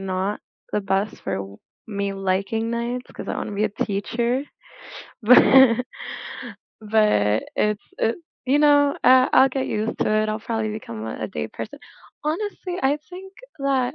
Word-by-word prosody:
not 190 +1 -2 0.3
the 210 - +1
best 195 +2 -1
for - - -1
w 100 0 -7 0.3
me 200 -1 -2
liking 195 +4 -1
nights, 240 +2 -3
'cause - - -8
I - - -2
wanna - - -4
be 205 +2 0
a - - +2
teacher, 235 +6 -1 0.8
but 245 +4 +8 1.4
but 210 - +2
it's 210 -1 +1 0.2
it, 225 - +1 0.3
you 275 +3 +3
know 290 -1 +4
I 255 0 +7
I'll 265 +1 +7
get 265 -1 -2
used 215 +2 -2
to - - +2
it, 215 0 +2
I'll 215 +1 -2
probably 220 -1 -2
become 115 - -7
a 110 - -4
a - - -4
day-person. 75 -6 -6 0.5
Honestly, 360 +2 -3
I 270 +2 +3
think 380 +1 -10 0.3
that, 270 -1 +1
220 Hz, 155 wpm, -23 LUFS, 200-260 Hz, 1.4 s, but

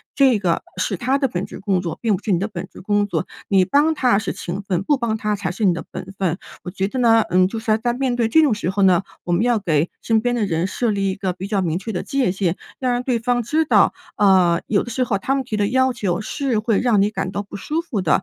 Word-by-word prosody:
这 265 -6 +4
个 175 -4 0
是 185 +1 -1
他 260 +6 0
的 275 - +2
本 185 -6 -3
职 - - -10
工 195 -2 0
作， 175 -2 -5
并 220 -4 +2
不 - - -15
是 215 - -1
你 175 - +2
的 195 - -1
本 185 -4 -7
职 - - -12
工 205 +1 +1
作， 195 -2 -2 0.2
你 190 -2 +4
帮 290 - +3
他 250 -8 +2
是 215 0 -2
情 185 +3 -5
分， 185 -3 -1
不 285 +9 +1
帮 235 -3 -1
他 210 -1 -1
才 190 -3 -3
是 195 +5 -5
你 185 -3 +4
的 165 - -5
本 185 - -7
分。 185 -2 -1 0.2
我 180 - -6
觉 195 +1 -1
得 260 - -5
呢， 230 -2 +5
嗯， 185 0 +4
就 225 +4 -5
是 225 +1 -7
要 215 - +4
在 240 +2 -1
面 255 0 -1
对 235 -2 +1
这 320 +8 +5
种 285 -8 +3
时 190 -3 -2
候 200 +1 -1
呢， 185 -2 +4 0.2
我 175 - -3
们 175 +5 +2
要 240 -2 +2
给 165 -4 0
身 225 -1 +2
边 245 +1 0
的 235 -3 0
人 165 -1 0
设 230 +5 -1
立 200 -2 0
一 - - -4
个 190 -2 -2
比 185 +2 -7
较 200 -1 0
明 170 -2 -1
确 195 +4 -5
的 180 - -3
界 270 -8 0
限， 185 -2 -1 0.2
要 255 - 0
让 245 0 0
对 250 -2 0
方 245 +1 0
知 305 +8 +1
道， 310 - +4 0.2
嗯， 185 -4 +4
有 205 - +1
的 - - -8
时 255 +2 0
候 225 -5 0
他 270 - 0
们 270 - -1
提 225 - -3
的 205 -1 +1
要 260 +3 +2
求 190 -6 -1
是 260 0 -1
会 215 -1 +1
让 235 -5 +3
你 205 - +3
感 200 -3 -3
到 200 - -2
不 200 - -11
舒 300 +11 -2
服 265 - -3
的。 175 - -3
210 Hz, 315 characters per minute, -21 LUFS, 185-245 Hz, 0.2 s, 呢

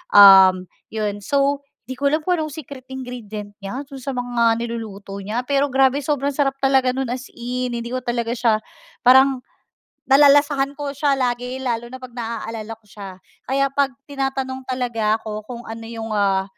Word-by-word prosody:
um, 190 -2 +9 0.2
yon 210 -2 -3
so, 280 +5 +1 0.3
'di 260 - -5
ko 280 +1 +1
alam 310 - +2
kung 355 +3 0
anong 310 -2 -3
secret 275 -3 -9
ingredient 220 -6 -7
niya 200 +7 -4
do'n 275 - -11
sa 275 - -3
mga 240 -2 +1
niluluto 220 -4 -6
niya 215 +4 -2
pero 280 -1 +1
grabe 270 +1 +3
sobrang 280 -1 -1
sarap 275 -2 0
talaga 265 -1 +3
no'n 265 0 -2
as 250 +1 -5
in, 250 +1 -3
hindi 235 +1 -4
ko 255 - -3
talaga 235 -1 -1
siya 225 -3 +2 0.5
parang, 265 0 +6 0.7
nalalasahan 280 0 +4
ko 285 -1 -4
siya 280 -1 +1
lagi 250 0 -1
lalo 240 -2 -3
na 260 - -9
pag 255 -1 -11
na-aalala 225 -2 -5
ko 225 - -42
siya. 200 -1 -10 0.4
Kaya 275 0 +1
pag 280 -1 +3 0.2
tinatanong 270 -2 -3
talaga 235 -4 0
ako 215 -1 -6
kung 240 -1 -7
ano 225 0 -7
yung, 225 -1 -6
ah, 195 -2 +2
250 Hz, 175 wpm, -21 LUFS, 225-275 Hz, 0.7 s, um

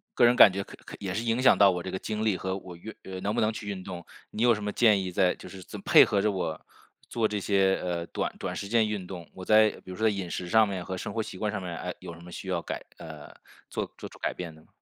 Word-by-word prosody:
个 120 - +6
人 120 +1 +5
感 110 - +9
觉 100 +1 -3
可 - - -12
可 - - -9
也 95 -2 -3
是 110 +5 -2
影 115 +1 +1
响 130 - +7
到 100 -1 +6
我 90 -1 -1
这 95 - -5
个 95 - -3
精 110 0 -3
力 105 -4 +2
和 95 +1 -3
我 90 -2 -10
运 105 +6 -9
呃， 95 -1 -7
能 100 +4 -2
不 - - +1
能 110 +1 +2
去 105 -1 -7
运 95 -2 -5
动。 90 -2 -7 0.3
你 110 - -4
有 120 -2 +5
什 105 - -6
么 105 - -2
建 110 -4 +4
议 90 - -4
在 90 0 +2
就 - - -11
是 95 -1 -10
这 - - -9
配 - - +7
合 100 - +1
着 105 0 +2
我 85 -5 -3 0.5
做 115 -2 +1
这 105 -1 -2
些， 95 0 +3
呃， 85 -1 -2
短 - - -3
短 - - -3
时 100 - -4
间 110 0 +3
运 100 -4 -3
动， 90 -3 -8
我 95 -1 -8
在 110 0 +6 0.2
比 95 - -8
如 - - -6
说 110 +2 +2
在 - - +5
饮 100 -3 -3
食 90 0 -4
上 110 -1 +5
面 95 -3 -4
和 95 +1 -5
生 - - -5
活 115 - -1
习 100 -3 -7
惯 105 +1 -1
上 105 -2 -3
面， 90 -2 -5
哎， 90 +1 -4
有 85 -2 -8
什 85 - -14
么 90 0 -11
需 95 - -8
要 90 -2 0
改 - - -5
呃， - - -10 0.4
做 - - -4
做 - - -8
出 - - -15
改 - - -2
变 85 -3 -6
的 - - -17
吗？ - - -26
95 Hz, 330 characters per minute, -28 LUFS, 90-110 Hz, 0.5 s, 感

